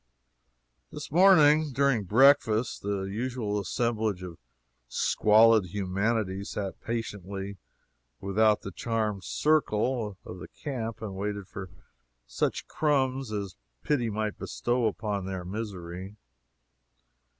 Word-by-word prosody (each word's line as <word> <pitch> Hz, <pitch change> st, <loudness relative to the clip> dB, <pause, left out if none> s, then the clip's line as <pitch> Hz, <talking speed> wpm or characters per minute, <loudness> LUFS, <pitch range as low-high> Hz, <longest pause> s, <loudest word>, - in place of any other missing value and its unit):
This 150 Hz, -1 st, -8 dB
morning, 155 Hz, -4 st, +6 dB
during 135 Hz, -6 st, +2 dB
breakfast, 115 Hz, +1 st, +4 dB
the 100 Hz, -1 st, -2 dB
usual 105 Hz, +1 st, -2 dB
assemblage 110 Hz, -1 st, -1 dB
of 85 Hz, -3 st, -8 dB, 0.5 s
squalid 110 Hz, -, +4 dB
humanity 100 Hz, +1 st, -1 dB
sat 100 Hz, -1 st, -5 dB
patiently 100 Hz, -4 st, -5 dB, 0.6 s
without 105 Hz, +2 st, +2 dB
the 100 Hz, -, -6 dB
charmed 105 Hz, 0 st, -2 dB
circle 120 Hz, -8 st, +1 dB
of 90 Hz, -, -8 dB
the -, -, -8 dB
camp 115 Hz, -6 st, -5 dB
and 105 Hz, -3 st, -5 dB
waited 100 Hz, 0 st, -4 dB
for 95 Hz, -1 st, -8 dB, 0.6 s
such -, -, -2 dB
crumbs 135 Hz, -5 st, 0 dB
as 100 Hz, -4 st, -4 dB, 0.3 s
pity 120 Hz, -6 st, +1 dB
might 110 Hz, 0 st, -3 dB
bestow 120 Hz, -1 st, 0 dB
upon 100 Hz, -2 st, -3 dB
their 95 Hz, -2 st, -5 dB
misery. 95 Hz, -2 st, -6 dB
105 Hz, 105 wpm, -28 LUFS, 95-120 Hz, 0.6 s, morning